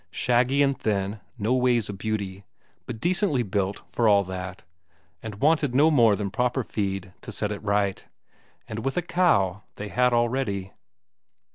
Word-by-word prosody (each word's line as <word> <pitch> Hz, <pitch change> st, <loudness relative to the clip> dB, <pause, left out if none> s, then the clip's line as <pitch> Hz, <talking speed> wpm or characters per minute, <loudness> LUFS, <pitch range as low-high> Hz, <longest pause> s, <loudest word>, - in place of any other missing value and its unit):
Shaggy 125 Hz, +3 st, +2 dB
and 140 Hz, -1 st, +2 dB
thin, 100 Hz, -2 st, -2 dB, 0.2 s
no 110 Hz, +2 st, 0 dB
ways 125 Hz, -4 st, +2 dB
a 105 Hz, -, -5 dB
beauty, 100 Hz, -1 st, -4 dB, 0.4 s
but 115 Hz, -3 st, -6 dB
decently 175 Hz, -, +1 dB
built 100 Hz, -1 st, -2 dB
for 115 Hz, -, +1 dB
all 100 Hz, -1 st, +5 dB
that, 95 Hz, 0 st, -7 dB, 0.6 s
and 110 Hz, -3 st, -6 dB
wanted 150 Hz, -3 st, +2 dB
no 150 Hz, +4 st, +5 dB
more 115 Hz, -8 st, +5 dB
than 100 Hz, -1 st, -3 dB
proper 125 Hz, +4 st, 0 dB
feed 95 Hz, -4 st, -3 dB
to -, -, -8 dB
set 105 Hz, 0 st, -2 dB
it 105 Hz, -, -5 dB
right. 100 Hz, -2 st, 0 dB, 0.6 s
And 110 Hz, 0 st, -5 dB
with 135 Hz, +5 st, -2 dB
a 180 Hz, -, +1 dB
cow 105 Hz, -, +2 dB
they 100 Hz, 0 st, -6 dB
had 125 Hz, +2 st, +2 dB
already.... 120 Hz, -5 st, 0 dB
110 Hz, 160 wpm, -25 LUFS, 100-125 Hz, 0.6 s, all